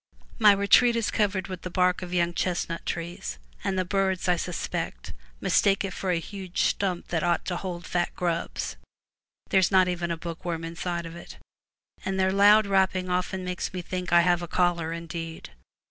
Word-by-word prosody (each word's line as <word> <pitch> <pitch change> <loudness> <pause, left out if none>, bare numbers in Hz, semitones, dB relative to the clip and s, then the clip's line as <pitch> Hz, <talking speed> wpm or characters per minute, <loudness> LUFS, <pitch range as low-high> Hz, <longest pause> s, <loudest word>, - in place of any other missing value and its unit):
My 215 -2 +8
retreat 200 +5 +5
is 230 -2 0
covered 205 -3 0
with 185 -2 -6
the 180 - -5
bark 180 +1 +2
of 180 -1 -6
young 175 -1 +1
chestnut 170 -2 -2
trees, 170 - -4 0.3
and 190 - -1
the 185 - +1
birds, 190 -1 0
I 180 - +4
suspect, 170 - -4 0.3
mistake 195 - +3
it 190 - -5
for 190 - -3
a 180 - +2
huge 185 +1 -3
stump 185 -3 -1
that 165 -2 0
ought 175 0 +1
to 180 - -2
hold 175 -2 -5
fat 175 -1 0
grubs 170 -2 -2 0.7
(there 190 - +5
is 185 - +3
not 185 -2 +5
even 175 -1 -2
a 170 - -2
book 165 +1 -7
worm 170 -2 -3
inside 170 +1 -4
of 165 0 -8
it), 170 - -11 0.7
and 190 0 -2
their 190 0 +3
loud 205 +2 +6
rapping 190 -2 +1
often 180 +1 -1
makes 180 0 -3
me 180 - -3
think 180 0 -4
I 175 0 +7
have 175 0 +2
a 175 - -5
caller 170 -2 +1
indeed. 165 -1 -6
180 Hz, 190 wpm, -26 LUFS, 170-190 Hz, 0.7 s, My